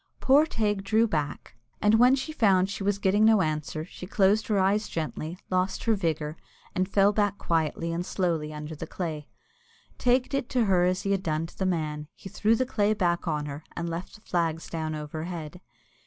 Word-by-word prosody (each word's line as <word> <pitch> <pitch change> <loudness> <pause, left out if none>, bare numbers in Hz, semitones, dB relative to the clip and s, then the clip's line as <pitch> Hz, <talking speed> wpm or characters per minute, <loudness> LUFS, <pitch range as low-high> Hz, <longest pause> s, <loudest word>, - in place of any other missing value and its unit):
Poor 285 +4 +5
Teig 210 -7 -1
drew 220 +3 +3
back, 150 - -3 0.2
and 210 +2 +4
when 250 +2 +6
she 275 +4 -4
found 195 -9 +4
that - - -7
she 200 - -4
was 200 0 +1
getting 200 +2 +2
no 220 -3 +5
answer, 155 0 -3
she 180 +1 -10
closed 205 +2 +2
her 210 - +1
eyes 195 +3 +2
gently, 160 +1 -4
lost 185 +1 0
her 230 - +3
vigour, 160 -5 -2 0.4
and 185 +1 0
fell 200 +1 +4
back 205 -1 +1
quietly 165 0 -1
and 170 +1 -2
slowly 170 -5 -1
under 150 +1 -6
the - - -7
clay. 155 -5 -4 0.7
Teig 250 +1 +3
did 275 -3 -2
to 245 -3 +2
her 180 -3 +3
as 185 0 0
he 200 - -1
had 195 -1 +1
done 160 -2 -1
to 165 - -13
the 190 - -1
man 155 -4 -2
he 195 - -10
threw 220 +4 +2
the 255 - 0
clay 215 -3 +1
back 175 -3 0
on 150 -2 -1
her, 145 +1 -7
and 170 -1 -2
left 170 +2 -6
the 215 - -16
flags 165 -3 -1
down 160 -1 -3
overhead. 155 +2 -6
185 Hz, 205 wpm, -27 LUFS, 160-210 Hz, 0.7 s, when